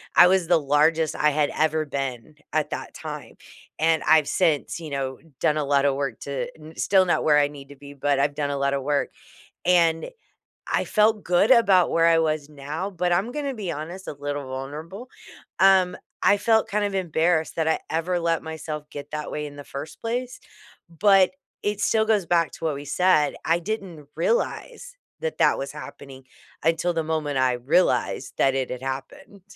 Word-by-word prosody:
I - - +9
was 185 -2 +2
the 170 -1 +4
largest 155 +2 +2
I 150 - +3
had 150 0 +1
ever 155 0 +1
been, 135 0 -5 0.2
at 155 0 -1
that - - -5
time, - - -8 0.4
and 160 -1 +2
I've 155 -2 +4
since, 165 -3 0
you 160 -2 -7
know, 135 -2 -3 0.2
done 150 - +2
a 150 - 0
lotta 140 0 +2
work 135 -4 -3
to 140 - -4
n 155 +1 -12
still 190 -1 +3
not 175 - +1
where 150 -1 +4
I 145 -1 +4
need 140 -1 -12
to 145 - -12
be, 140 +1 -12
but 140 0 0
I've 145 +1 +1
done 145 -1 -1
a 140 - -2
lotta 140 0 0
work, 145 +1 -1 0.5
and 170 -2 +3 0.6
I - - +1
felt 215 0 +2
good 180 +6 +3
about 200 -8 +5
where 165 0 +3
I 165 -1 +5
was 155 -2 0
now, 150 +6 -5
but 180 -2 -1
I'm 195 +8 0
gonna 280 -1 -3
be 200 -7 -4
honest, 170 +5 -7
a - - -4
little 145 -1 -5
vulnerable, 150 - -7 0.5
um, 190 -1 +5 0.3
I 205 - +6
felt 220 +1 +2
kind 210 +1 0
of 200 -1 -2
embarrassed 170 -3 0
that 160 - 0
I 160 - +1
ever 175 +2 -1
let 165 -1 0
myself 155 -1 -6
get 145 0 -8
that 150 -1 -5
way 150 - -3
in 145 -1 -9
the 145 - -9
1st 145 +3 -8
place, 245 +2 -3 0.5
but 190 +3 +4 0.3
it 205 0 -1
still 220 +1 +2
goes 215 -5 +1
back 170 -2 +2
to - - -9
what 155 -2 0
we 140 - -7
said, 150 0 +2
I 165 +1 +2
didn't 175 -6 -6
realize - - -2 0.2
that 485 0 -4
that - - +3
was 135 0 -5
happening, 135 -3 -11 0.4
until 165 +2 +1
the 165 -1 -1
moment 155 -3 -2
I 130 -1 +2
realized 125 - +1
that 135 -1 +3
it 130 -1 -2
had 125 0 -5
happened. 135 +8 -7
160 Hz, 195 wpm, -24 LUFS, 145-185 Hz, 0.6 s, I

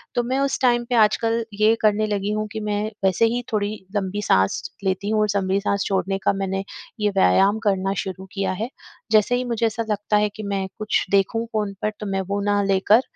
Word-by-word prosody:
तो 245 - +3
मैं 255 +3 -1
उस 275 -1 0
टाइम 240 -2 +3
पे 245 - +1
आजकल 225 +1 +3
ये 215 +2 +4
करने 215 0 +3
लगी 205 0 -1
हूँ 215 0 -1
कि 220 - -4
मैं 210 -1 -1 0.2
वैसे 190 +3 +3
ही 240 +2 -1
थोड़ी 205 -2 0 0.3
लम्बी 205 0 -1
सांस 95 - +2 0.2
लेती 190 +1 -1
हूँ 215 0 +1
और 210 - +3
लंबी 195 -1 +1
सांस 200 0 0
छोड़ने 195 0 0
का - - +3
मैंने 195 0 -2 0.4
ये 210 - +2
व्यायाम 195 +1 +3
करना 195 -1 +1
शुरू 190 0 -7
किया 195 -2 -1
है। 230 - -2 0.4
जैसे 215 +2 +4
ही 250 - 0
मुझे 235 -2 -1
ऐसा 225 +1 -1
लगता 210 0 +1
है 210 0 +2
कि 215 - -7
मैं 195 -1 -2
कुछ 215 -1 0
देखूँ 200 +4 +2
फ़ोन 210 -2 -1
पर 215 - 0
तो 210 - -5
मैं 195 -1 -1
वो 200 0 0
ना 205 0 +2
लेकर 195 +4 +4
210 Hz, 220 wpm, -22 LUFS, 195-220 Hz, 0.4 s, ये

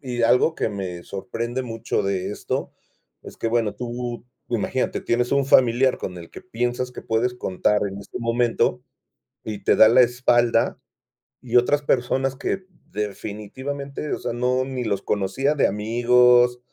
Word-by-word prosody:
y 120 - -1
algo 125 +7 +4
que, - - -1
me 95 -4 -5
sorprende 120 +5 -4
mucho, 115 -4 -2
de 95 -2 -2
esto, - - -4 0.5
es - - -12
que, - - -2
bueno, 115 -2 0
tú, 120 0 -5 0.2
imagínate, 120 +2 -1
tienes 120 +1 0
un 140 -1 +2
familiar 130 0 +4
con 90 - -5
el 85 -1 -11
que - - -10
piensas 125 -7 -2
que - - -9
puedes 115 +2 0
contar 105 -2 0
en 100 +1 -7
este 100 - -8
momento, 120 0 +1 0.6
y 105 -2 -6
te - - +3
da 110 - +8
la 120 +3 +5
espalda, 120 -1 +2 0.7
y - - -1
otras 145 +4 +3
personas 135 0 0
que 190 +6 -3 0.3
definitivamente, 120 +8 -5
o - - -5
sea, - - -4
no 125 +2 0
ni 130 -2 -4
los 100 -3 -1
conocía 105 +9 0
de 145 - +3
amigos, 120 +3 +4
120 Hz, 160 wpm, -23 LUFS, 110-125 Hz, 0.7 s, da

